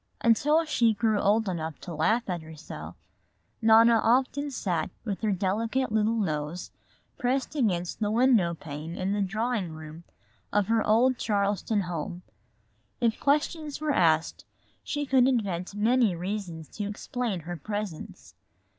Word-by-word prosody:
Until 295 +8 +3
she 235 -7 +2
grew 215 0 +1
old 215 +2 +2
enough 160 -5 -4
to 175 - -7
laugh 220 +10 +1
at 175 -3 -2
herself, 160 0 -9 0.7
Nona 225 +1 +6
often 265 +5 +2
sat 180 - -2 0.2
with 200 -4 -3
her 215 -2 +1
delicate 220 +7 0
little 220 +1 +2
nose 155 -3 -3 0.5
pressed 260 +2 0
against 185 - -1
the 210 -2 0
window 220 -7 +3
pane 155 +2 -7
in 190 +2 -1
the 205 - 0
drawing 215 -2 -1
room 155 +1 -10 0.5
of 205 -1 +2
her 225 -1 +3
old 240 +4 +3
Charleston 205 0 0
home. 175 0 -5 0.8
If 235 -3 +1
questions 300 +1 0
were 305 -1 0
asked 160 - +2 0.4
she 290 0 -2
could 260 -2 +4
invent 200 -7 -1
many 225 -1 +3
reasons 175 -3 -5
to 205 -1 -2
explain 210 -2 -3
her 175 +3 -6
presence. 205 0 -6
210 Hz, 140 wpm, -27 LUFS, 175-235 Hz, 0.8 s, Nona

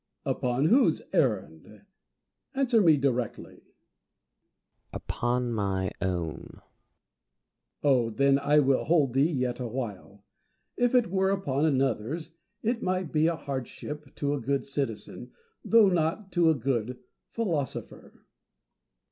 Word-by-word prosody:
Diogenes. - - -1
Upon 125 +3 0
whose 235 - +4
errand? 100 - -1 0.7
Answer 255 -4 +3
me 160 -5 +5
directly. 125 -5 -2
Plato. - - -35 1.3
Upon 120 0 -2
my 95 -3 -1
own. 85 -4 -3
Diogenes. - - -32
Oh, 130 -5 +3
tlien 140 +4 +3
I 145 +1 +2
will 135 -1 +2
hold 145 -6 +2
thee 140 +4 +3
yet 130 -6 -2
awhile. 110 -5 -6 0.5
If 245 +1 +1
it 240 -8 +3
were 190 0 +2
upon 155 -7 0
another's, 135 +2 -1 0.3
it 230 +1 0
might 185 -3 -1
be 155 +1 +3
a 170 - +1
hardship 140 0 -6
to 145 0 -1
a 145 - -3
good 140 +3 -1
citizen, 140 0 -4 0.3
though 225 -3 +5
not 180 +3 -1
to 170 -2 +3
a 160 - +3
good 125 -2 -2 0.3
philosopher. 165 - -4
140 Hz, 125 wpm, -28 LUFS, 120-165 Hz, 1.3 s, me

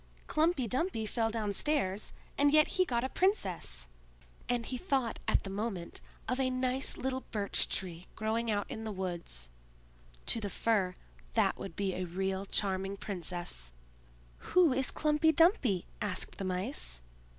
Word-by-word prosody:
Humpy 310 -5 +2
Dumpy 255 - -1
fell 225 +1 0
downstairs, 215 0 0 0.2
and 285 0 +4
yet 305 0 +6
he 370 -1 +3
got 240 -6 0
a 260 - -1
princess!" 185 - +1 0.6
and 240 -1 +1
he 255 - -3
thought 265 -6 0
at - - +3
the 195 - -5
moment 195 -4 -4 0.3
of 255 +1 0
a 260 -1 +2
nice 255 +1 +1
little 260 0 -2
Birch 205 -2 +1
tree 180 -2 -3
growing 225 +2 -1
out 205 -2 +1
in 220 - -5
the 220 - -3
woods; 170 - -5 0.7
to 230 - +3
the 205 - -2
Fir, 195 -3 +1 0.4
that - - +3
would 165 - -6
be 195 -2 0
a 185 0 -2
real 190 +2 -2
charming 195 0 0
princess. 175 - -2 0.7
"Who 350 -5 +4
is 265 0 +2
Klumpy 305 +1 +3
Dumpy?" 280 - +4 0.2
asked 205 -3 0
the 195 - -2
Mice. 185 - -1
220 Hz, 150 wpm, -32 LUFS, 190-265 Hz, 0.7 s, yet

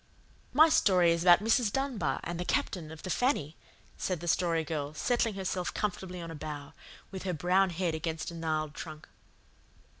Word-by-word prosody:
"My 310 +5 +7
story 185 - +4
is 170 0 +1
about 175 +2 +6
Mrs. 225 -1 +3
Dunbar 230 - -1
and 175 0 -4
the - - -1
Captain 170 -2 -1
of 160 - -11
the 185 - -3
FANNY," 165 - 0 0.4
said 185 -3 -1
the 175 - -7
Story 165 -1 +2
Girl, 150 -1 -4
settling 235 +3 +1
herself 185 -2 -3
comfortably 185 -3 -3
on 165 -1 -6
a - - -7
bough, 145 -1 -7 0.4
with 190 -1 -6
her 185 -1 -2
brown 185 +4 +3
head 175 -1 -1
against 160 +1 -3
a - - -9
gnarled 155 -2 -2
trunk. 155 -1 -8
175 Hz, 180 wpm, -30 LUFS, 160-190 Hz, 0.4 s, My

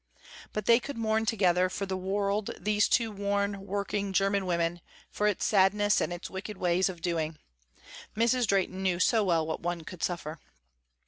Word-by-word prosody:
But 215 -1 -4
they 235 0 +6
could 280 0 -7
mourn 220 0 0
together 185 -4 +2
for 195 - -3
the 190 -1 -3
world 200 +2 -1
these 210 0 +2
two 230 -2 +2
worn, 200 -1 -2
working 200 0 -2
german 195 0 +1
women, 170 0 0 0.3
for 210 - 0
its 205 - 0
sadness 205 0 +3
and - - -1
its 175 0 -5
wicked 190 +2 -7
ways 180 +1 +2
of 175 -3 -8
doing. 165 -3 -1 0.8
Mrs. 235 +1 +2
Drehten 190 -1 0
knew 185 -2 0
so 220 +3 +3
well 170 -4 +2
what 160 - -3
one 175 0 -2
could 170 +1 -10
suffer. 165 -3 -3
195 Hz, 175 wpm, -29 LUFS, 180-210 Hz, 0.8 s, they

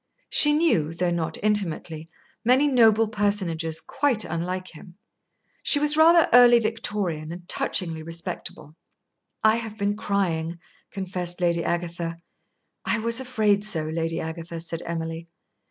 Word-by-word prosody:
She 295 0 +5
knew, 175 - +1
though 175 0 0
not 165 -1 -2
intimately, 165 -6 -1 0.3
many 255 +5 +4
noble 225 -4 +4
personages 185 -7 -1
quite 260 - 0
unlike 180 +3 -4
him. 175 +2 -14 0.7
She - - +3
was 300 +1 +3
rather 330 +1 +6
early 245 -1 +8
Victorian 210 -8 -2
and 175 +1 -9
touchingly 165 -3 0
respectable. 165 -2 -6 0.7
"I 220 +1 +5
have 225 -2 -6
been 205 0 0
crying," 175 -6 -1 0.3
confessed 180 -2 -4
Lady 170 -1 +1
Agatha. 170 -1 -3 0.7
"I 230 - 0
was 230 +2 +1
afraid 215 -6 +1
so, 180 -7 -2
Lady 165 +1 -2
Agatha," 165 +1 -6
said 165 0 -5
Emily. 165 0 -4
180 Hz, 130 wpm, -24 LUFS, 165-220 Hz, 0.7 s, early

